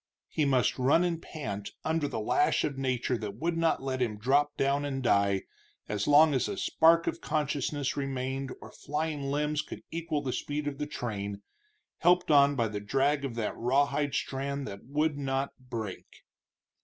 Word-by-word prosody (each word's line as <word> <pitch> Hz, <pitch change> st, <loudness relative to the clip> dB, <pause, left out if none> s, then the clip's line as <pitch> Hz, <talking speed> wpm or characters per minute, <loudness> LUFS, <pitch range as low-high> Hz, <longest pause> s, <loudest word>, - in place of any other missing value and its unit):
He 155 Hz, -, 0 dB
must 130 Hz, -3 st, +2 dB
run 140 Hz, +7 st, +4 dB
and 170 Hz, -2 st, -1 dB
pant, 105 Hz, -, -6 dB
under 160 Hz, -2 st, +1 dB
the 125 Hz, -5 st, -3 dB
lash 110 Hz, +6 st, +2 dB
of 140 Hz, -, -1 dB
nature 130 Hz, -2 st, -1 dB
that 105 Hz, -2 st, -5 dB
would 165 Hz, +8 st, -1 dB
not 165 Hz, -4 st, +1 dB
let 130 Hz, -1 st, -2 dB
him 110 Hz, -4 st, 0 dB
drop 140 Hz, +6 st, +2 dB
down 140 Hz, +1 st, +1 dB
and 135 Hz, -2 st, -3 dB
die, 100 Hz, -4 st, +3 dB, 0.4 s
as 105 Hz, -1 st, -2 dB
long 150 Hz, +1 st, +7 dB
as 130 Hz, -, +1 dB
a 200 Hz, -, -4 dB
spark 165 Hz, -1 st, +4 dB
of 170 Hz, -, -2 dB
consciousness 145 Hz, -2 st, -1 dB
remained 135 Hz, -1 st, -3 dB
or -, -, -10 dB
flying 150 Hz, 0 st, -3 dB
limbs 145 Hz, +2 st, 0 dB
could -, -, -9 dB
equal 160 Hz, -3 st, -2 dB
the 130 Hz, -2 st, -2 dB
speed 145 Hz, 0 st, -3 dB
of 140 Hz, -2 st, -4 dB
the 150 Hz, -, -2 dB
train, 100 Hz, -8 st, -4 dB, 0.6 s
helped 180 Hz, -1 st, +4 dB
on 140 Hz, -1 st, +6 dB
by 115 Hz, -3 st, +1 dB
the 105 Hz, -1 st, -4 dB
drag 135 Hz, +7 st, +1 dB
of 130 Hz, -4 st, -3 dB
that 115 Hz, -3 st, -2 dB
rawhide 140 Hz, +3 st, +1 dB
strand 140 Hz, +1 st, -2 dB
that 100 Hz, +1 st, -8 dB
would 150 Hz, +2 st, 0 dB
not 135 Hz, 0 st, -1 dB
break. 115 Hz, -6 st, -6 dB
140 Hz, 180 wpm, -29 LUFS, 125-150 Hz, 0.6 s, long